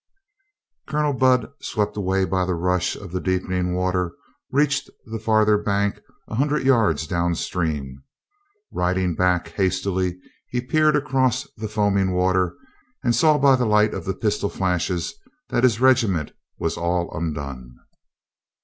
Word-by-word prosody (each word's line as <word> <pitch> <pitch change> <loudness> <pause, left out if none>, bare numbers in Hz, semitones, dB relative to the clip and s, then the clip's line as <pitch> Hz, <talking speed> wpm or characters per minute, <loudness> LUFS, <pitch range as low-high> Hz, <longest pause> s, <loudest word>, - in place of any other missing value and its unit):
Colonel 150 -1 0
Budd, 130 0 +2
swept 105 -2 -2
away 95 -1 +1
by 95 0 0
the 90 -1 -1
rush 90 +1 0
of - - -10
the 90 0 -3
deepening 90 -1 -1
water, 90 -1 0 0.4
reached 140 0 +1 0.2
the 115 -1 -5
farther 110 -1 +3
bank 100 -1 -1 0.3
a - - -9
hun 135 +7 +2
dred 150 -1 0
yards 110 - +3
down 85 +1 0
stream. 75 -7 -3 0.7
Riding 90 0 0
back 90 0 +1
hastily, 95 0 -1 0.3
he 125 - -1
peered 155 +4 +2
across 130 -3 +1
the 110 -1 -5
fo, 105 0 0
aming 95 -1 +1
water 90 -1 +1 0.5
and 120 - +2
saw 155 -2 +4
by 135 -1 +5
the 125 -2 0
light 105 0 +3
of - - -5
the 95 - -2
pistol 105 -1 -1
flashes 90 -2 -1 0.4
that 120 - 0
his 120 -4 +4
regiment 115 - +3 0.3
was 80 - -2
all 85 0 -1
undone. 70 -6 -5
95 Hz, 150 wpm, -23 LUFS, 90-120 Hz, 0.7 s, by